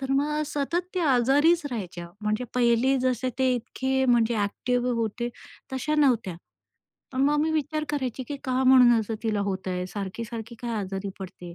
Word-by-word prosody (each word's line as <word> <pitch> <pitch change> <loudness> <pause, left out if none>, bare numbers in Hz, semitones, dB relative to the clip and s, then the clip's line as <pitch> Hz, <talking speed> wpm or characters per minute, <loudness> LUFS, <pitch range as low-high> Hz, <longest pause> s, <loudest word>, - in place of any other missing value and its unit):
तर 265 0 -4
मग 300 +2 +1
सतत 335 +5 -2
ते 365 - 0
आजारीच 290 +4 +4
राहायच्या. 175 -6 -5
म्हणजे 215 +3 -1
पहिले 245 +2 +3
जसे 255 0 0
ते 260 -1 +3
इतके 265 +2 -1
म्हणजे 235 -2 +3
अ‍ॅक्टिव्ह 245 +4 0
होते 230 +1 -2 0.4
तशा 265 +4 -1
नव्हत्या. 230 - +2 0.8
पण 260 - -1
मग 290 +2 +3
मी 315 - +1
विचार 310 0 -1
करायची, 260 -3 -2
की 290 - -3
का 260 0 0
म्हणून 255 -2 +7
असं 220 +1 -4
तिला 215 -3 0
होत 195 -1 -3
आहे. 180 0 -2
सारखी-सारखी 220 +4 -6
काय 240 - -3
आजारी 195 0 -4
पडते. 175 -2 -9
245 Hz, 165 wpm, -26 LUFS, 215-270 Hz, 0.8 s, म्हणून